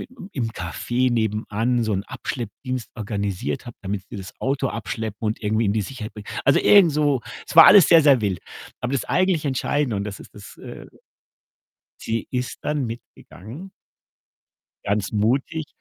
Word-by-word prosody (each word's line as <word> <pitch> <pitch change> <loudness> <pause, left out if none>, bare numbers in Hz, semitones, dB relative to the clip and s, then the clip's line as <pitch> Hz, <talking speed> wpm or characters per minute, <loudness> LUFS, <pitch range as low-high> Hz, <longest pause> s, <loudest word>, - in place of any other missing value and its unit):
i - - -7 0.3
im 120 -5 -2
Café 120 +8 -1
nebenan 110 +1 0
so 110 - -1
'n 95 0 -1
Abschleppdienst 125 +1 -5
organisiert 100 -8 -3
habe, 120 - -10
damit 95 0 -3
sie 115 - -8
das 95 -1 -8
Auto 135 0 0
abschleppen 110 -1 -5
und 105 - -2
irgendwie 110 +1 0
in 100 - +2
die 110 0 0
Sicherheit 110 0 -7
bringen. 105 -1 -10 0.2
Also, 135 - +5
irgend 200 -5 +6
so 145 -4 +1 0.3
es - - -8
war 165 0 +10
alles 195 -5 +9
sehr, 165 -2 +7
sehr 140 -5 +5
wild. 100 -4 -1 0.4
Aber 125 +2 -3
das 140 - -1
eigentlich 185 -4 +1
Entscheidende 140 -1 0
und 100 - -1
das 100 -2 -6
ist - - -15
das, 100 -3 -12
äh - - -10 1.2
sie 115 0 -2
ist 125 -1 -3
dann 145 -4 -1
mitgegangen 115 - -10 1.1
ganz 100 -1 -1
mutig. 135 +9 0
115 Hz, 165 wpm, -23 LUFS, 105-135 Hz, 1.2 s, war